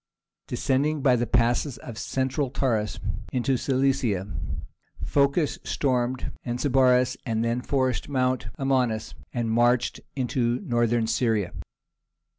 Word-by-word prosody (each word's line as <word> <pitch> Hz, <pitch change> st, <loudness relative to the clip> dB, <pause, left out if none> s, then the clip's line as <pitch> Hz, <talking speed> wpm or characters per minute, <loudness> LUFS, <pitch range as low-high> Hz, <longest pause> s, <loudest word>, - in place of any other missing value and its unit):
Descending 145 Hz, +2 st, 0 dB
by 130 Hz, -3 st, +5 dB
the 120 Hz, 0 st, 0 dB
passes 120 Hz, +3 st, +1 dB
of 120 Hz, -, -8 dB
the 110 Hz, -, -8 dB
Central 135 Hz, +1 st, -1 dB
Taurus 115 Hz, -5 st, -1 dB, 0.3 s
into 130 Hz, +1 st, +1 dB
Cilicia, 130 Hz, -7 st, +1 dB, 0.8 s
Phocas 140 Hz, +2 st, +2 dB
stormed 130 Hz, -2 st, 0 dB
Anazarbus, 125 Hz, 0 st, +3 dB
and 115 Hz, -2 st, -1 dB
then 120 Hz, +1 st, 0 dB
forced 130 Hz, -1 st, 0 dB
Mount 130 Hz, -4 st, 0 dB
Amanus, 125 Hz, -5 st, 0 dB, 0.2 s
and 120 Hz, -2 st, -1 dB
marched 120 Hz, +1 st, +2 dB, 0.2 s
into 125 Hz, -2 st, 0 dB
Northern 120 Hz, -1 st, +1 dB
Syria. 110 Hz, -5 st, 0 dB
125 Hz, 110 wpm, -26 LUFS, 120-135 Hz, 0.8 s, by